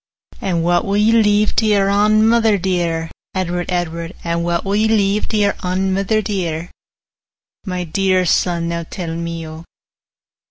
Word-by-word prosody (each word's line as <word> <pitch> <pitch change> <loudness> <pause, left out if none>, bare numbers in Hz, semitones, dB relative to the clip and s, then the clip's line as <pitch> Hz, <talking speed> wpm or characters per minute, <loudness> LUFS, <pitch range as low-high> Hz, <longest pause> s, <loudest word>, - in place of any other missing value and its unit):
'And 170 -4 -1
what 175 0 +2
will 200 +1 -1
ye 210 +2 +4
leave 210 -2 +3
to 225 - +3
your 200 -2 +3
ain 210 +2 +3
mither 225 -2 +3
dear, 170 -3 -1 0.2
Edward, 175 -1 -2
Edward? 170 -1 -3
50 170 - -9
And 170 0 0
what 170 +1 -1
will 195 +1 0
ye 215 +1 +2
leave 210 -1 +1
to 220 - -1
your 205 -1 +2
ain 190 +1 0
mither 200 +3 0
dear, 175 -5 -3 1.0
My 180 -1 -2
dear 185 +2 +1
son, 170 0 +1
now 170 0 -2
tell 170 -3 -5
me, 170 -1 -4
O? 160 +1 -9
185 Hz, 170 wpm, -18 LUFS, 170-205 Hz, 1.0 s, ye